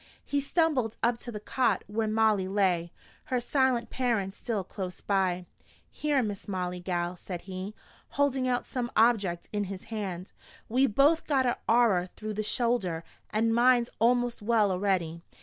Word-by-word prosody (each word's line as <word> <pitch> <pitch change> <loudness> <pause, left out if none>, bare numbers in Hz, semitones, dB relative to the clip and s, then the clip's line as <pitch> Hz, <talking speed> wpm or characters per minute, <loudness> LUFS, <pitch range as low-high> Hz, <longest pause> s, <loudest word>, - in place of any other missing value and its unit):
He 285 0 0
stumbled 280 -7 +1
up 235 0 +2
to 240 - -7
the 210 - -5
cot 250 +3 0
where 220 +2 -1
Molly 215 -3 +2
lay, 185 -4 +1 0.3
her 255 -4 0
silent 250 -1 +1
parents 225 -7 0
still 220 -5 -2
close 185 -1 -6
by. 185 -3 0 0.5
"Here, 290 -4 +1
Miss 205 -2 -5
Molly, 180 -2 -3
gal," 175 -1 -2
said 175 0 -7
he, 190 +2 -6 0.4
holding 270 -2 +2
out 245 -1 0
some 245 -2 -3
object 205 -7 +3
in 205 -1 0
his 190 0 -7
hand. 190 -4 -4 0.3
"We 260 +4 +3
both 285 +9 +3
got 270 -3 +2
a 245 - 0
arrer 220 -6 +4
through 215 0 -5
the 210 - -2
shoulder, 215 -7 0 0.3
an' 225 +1 +1
mine's 240 0 +4
a'most 245 0 +2
well 215 -2 +3
a'ready. 180 -3 0
215 Hz, 160 wpm, -29 LUFS, 190-245 Hz, 0.5 s, arrer